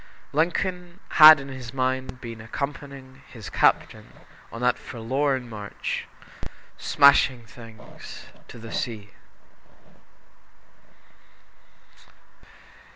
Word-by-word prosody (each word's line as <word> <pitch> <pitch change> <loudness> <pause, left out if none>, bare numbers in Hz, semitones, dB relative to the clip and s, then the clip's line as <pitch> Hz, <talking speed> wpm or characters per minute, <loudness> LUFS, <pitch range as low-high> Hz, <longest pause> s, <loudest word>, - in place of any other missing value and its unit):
Lincoln 175 +3 -2
had 155 -1 +9
in 140 0 -9
his 130 -2 -9
mind 130 -1 -2
been 115 -2 -8
accompanying 140 +2 -7
his 110 -4 -11
captain - - 0 0.4
on 115 - -8
that 125 0 +1
forlorn 130 +2 -2
march 105 -3 -6 0.7
"smashing 140 -4 +3
things" 115 -1 -13 0.2
to - - -12
the 115 -1 -10
sea. 105 -4 -5
130 Hz, 85 wpm, -24 LUFS, 115-140 Hz, 0.7 s, had